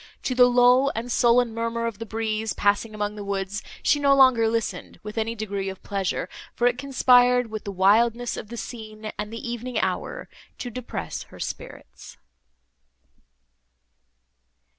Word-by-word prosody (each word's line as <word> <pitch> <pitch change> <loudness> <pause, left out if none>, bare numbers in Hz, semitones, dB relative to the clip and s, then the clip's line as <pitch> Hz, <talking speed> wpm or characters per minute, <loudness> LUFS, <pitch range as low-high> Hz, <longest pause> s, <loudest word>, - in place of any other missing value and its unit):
To 255 - -1
the 250 0 +6
low 250 +2 +5
and 235 +2 -4
sullen 240 -1 +3
murmur 230 0 -2
of 230 -4 -4
the 225 - -6
breeze, 220 0 -2
passing 205 +2 +1
among 210 0 -2
the 210 -1 -7
woods, 200 +1 -3 0.2
she 290 - +3
no 280 -1 +4
longer 260 -4 +5
listened 225 0 -3
with 210 0 -7
any 225 0 -1
degree 200 -3 -3
of 190 - -9
pleasure, 195 -2 -2 0.3
for 240 - 0
it 245 0 +2
conspired 250 -3 +4
with 215 -1 -6
the 200 - -3
wildness 225 +5 +3
of - - -7
the 235 +2 -8
scene 215 -2 -7
and 210 +1 -4
the 230 +1 -6
evening 240 +1 -4
hour, - - -3 0.3
to 245 - -6
depress 225 - -5
her - - -14
spirits. - - -8
230 Hz, 160 wpm, -24 LUFS, 210-245 Hz, 0.3 s, the